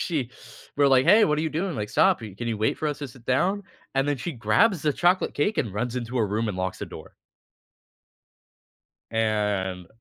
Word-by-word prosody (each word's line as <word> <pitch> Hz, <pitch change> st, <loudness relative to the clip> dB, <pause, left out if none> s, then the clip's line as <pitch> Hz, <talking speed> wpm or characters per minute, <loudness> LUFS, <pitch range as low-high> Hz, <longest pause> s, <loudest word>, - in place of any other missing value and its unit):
she 145 Hz, -8 st, -2 dB, 0.5 s
we're 145 Hz, -1 st, +4 dB
like, 130 Hz, -1 st, +5 dB
"Hey, 210 Hz, +4 st, +7 dB
what 150 Hz, -1 st, +1 dB
are -, -, 0 dB
you 160 Hz, -, 0 dB
doing? 170 Hz, +2 st, -2 dB
Like, 105 Hz, -1 st, -3 dB
stop 110 Hz, -, +3 dB
i 105 Hz, -4 st, -8 dB
can 120 Hz, +2 st, -4 dB
you 110 Hz, -2 st, -2 dB
wait 110 Hz, -, 0 dB
for 155 Hz, -, -1 dB
us 145 Hz, -, -4 dB
to 145 Hz, -, -5 dB
sit 120 Hz, -1 st, -16 dB
down?" 185 Hz, +11 st, +1 dB, 0.3 s
And 135 Hz, +1 st, +1 dB
then 145 Hz, -, 0 dB
she 135 Hz, +7 st, -4 dB
grabs 180 Hz, -, +2 dB
the 150 Hz, -2 st, +2 dB
chocolate 180 Hz, +5 st, +2 dB
cake 205 Hz, +10 st, 0 dB
and 115 Hz, -8 st, -1 dB
runs 120 Hz, +4 st, -3 dB
into 120 Hz, +1 st, -4 dB
her 110 Hz, -, +2 dB
room 110 Hz, +3 st, -1 dB
and 100 Hz, -, -3 dB
locks 95 Hz, 0 st, -3 dB
the -, -, -5 dB
door. -, -, -11 dB, 2.0 s
and 105 Hz, -5 st, -1 dB
125 Hz, 215 wpm, -25 LUFS, 110-155 Hz, 2.0 s, Hey